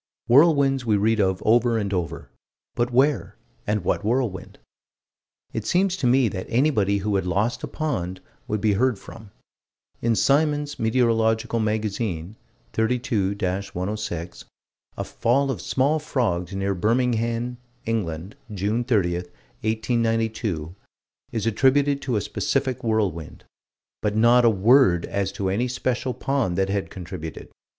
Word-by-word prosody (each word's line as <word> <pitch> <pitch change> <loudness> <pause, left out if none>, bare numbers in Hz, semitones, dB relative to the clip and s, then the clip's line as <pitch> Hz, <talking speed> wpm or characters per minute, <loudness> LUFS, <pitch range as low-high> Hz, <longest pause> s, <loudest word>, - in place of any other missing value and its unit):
Whirlwinds 140 -1 +5
we 110 -3 +2
read 110 +2 +2
of 95 -2 +1
over 120 +1 +4
and 100 -2 -2
over 85 -4 -4 0.4
but 120 +1 -1
where 135 +3 +2 0.3
and 105 -2 0
what 95 - 0
whirlwind? 110 -4 -2 1.0
It 110 - -3
seems 185 +1 +2
to 130 - 0
me 130 0 +4
that 95 -2 -6
anybody 115 -6 +2
who 105 -2 +1
had 95 - -2
lost 105 +6 0
a - - -4
pond 100 - -3 0.3
would 105 -1 -2
be 105 -1 +3
heard 125 +2 +2
from. 110 +2 -12 0.7
In 115 -1 +2
Symons' 145 +2 +1
Meteorological 115 -1 +1
Magazine, 105 -4 -2 0.4
32 110 -4 0 0.4
106, 90 -3 -4 0.5
a - - -2
fall 135 +4 +1
of - - -5
small 140 +4 +1
frogs, 95 - -1
near 100 0 0
Birmingham, 115 +3 0 0.3
England, 95 -5 -3 0.2
June 105 +4 -1
30, 105 -8 +1
1892, 110 -2 -2 0.6
is 110 -2 -2
attributed 140 +5 +2
to 130 -3 -2
a 105 - +1
specific 130 +2 -1
whirlwind 100 -8 -1 0.6
but 105 -1 -1
not 120 +2 +5
a - - +7
word 105 -3 +4
as 100 -1 -2
to 100 -1 -2
any 110 +7 0
special 125 0 -2
pond 135 -11 -1
that 95 0 +1
had 100 0 -2
contributed. 85 -3 -8
110 Hz, 135 wpm, -24 LUFS, 100-125 Hz, 1.0 s, a